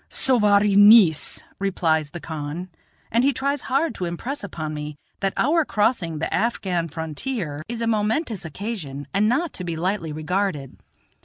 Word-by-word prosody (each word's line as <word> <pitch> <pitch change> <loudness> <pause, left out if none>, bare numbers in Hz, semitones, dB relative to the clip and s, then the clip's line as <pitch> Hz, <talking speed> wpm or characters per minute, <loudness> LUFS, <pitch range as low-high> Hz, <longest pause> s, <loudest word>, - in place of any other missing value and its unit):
"Sowari 210 -5 +3
neis," 205 -6 +6 0.2
replies 160 -6 +1
the 175 - -7
khan; 160 +3 -5 0.4
and 235 +2 +3
he 280 - +4
tries 280 +2 -1
hard 275 +2 +1
to 185 - -4
impress 235 +12 -4
upon 155 -6 -5
me 150 0 -6 0.2
that 195 -1 0
our 325 +3 +3
crossing 210 - 0
the 160 - -3
Afghan 185 -7 0
frontier 160 - -4
is 235 -1 -4
a - - 0
momentous 220 - 0
occasion, 160 -5 -5
and 210 +2 +3
not 290 +6 0
to 180 - -5
be 170 -2 -3
lightly 170 -1 -2
regarded. 155 -2 -2
195 Hz, 155 wpm, -23 LUFS, 160-230 Hz, 0.4 s, neis